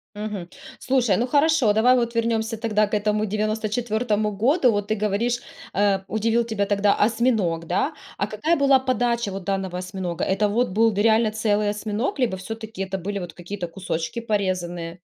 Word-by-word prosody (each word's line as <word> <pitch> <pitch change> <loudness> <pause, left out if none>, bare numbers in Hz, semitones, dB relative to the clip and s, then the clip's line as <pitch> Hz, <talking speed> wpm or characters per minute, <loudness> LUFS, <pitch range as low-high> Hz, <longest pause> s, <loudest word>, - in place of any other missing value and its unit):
Мгм. 205 -4 -5 0.3
Слушай, 245 -7 +2
ну 245 +2 0
хорошо, 285 -5 +3
давай 240 +4 +5
вот 235 -1 0
вернёмся 225 -1 0
тогда 215 -2 +1
к 210 - -14
этому 210 +1 +1
94 215 +1 -1
году. 255 - +3
Вот 205 -1 -1
ты 215 - 0
говоришь, 215 +4 0 0.3
э, 200 -1 +2
удивил 225 +2 +1
тебя 220 -3 -1
тогда 200 0 +2
осьминог, 215 -7 +1
да. 275 - 0 0.2
А - - 0
какая 260 +11 0
была 275 -1 +5
подача 240 -4 0
вот 195 -1 -6
данного 190 -2 -2
осьминога? 185 -2 -4
Это 195 +2 +1
вот 235 +5 +1
был 225 +4 +3
д 205 -1 -1
реально 220 0 +4
целый 210 -1 +1
осьминог 210 +6 -2
либо 225 -7 +1
всё-таки 220 +1 -7
это 195 0 -3
были 200 +2 -4
вот 175 -2 -7
какие-то 180 0 -6
кусочки 170 +2 -4
порезанные? 180 -5 -2
215 Hz, 170 wpm, -23 LUFS, 195-230 Hz, 0.3 s, давай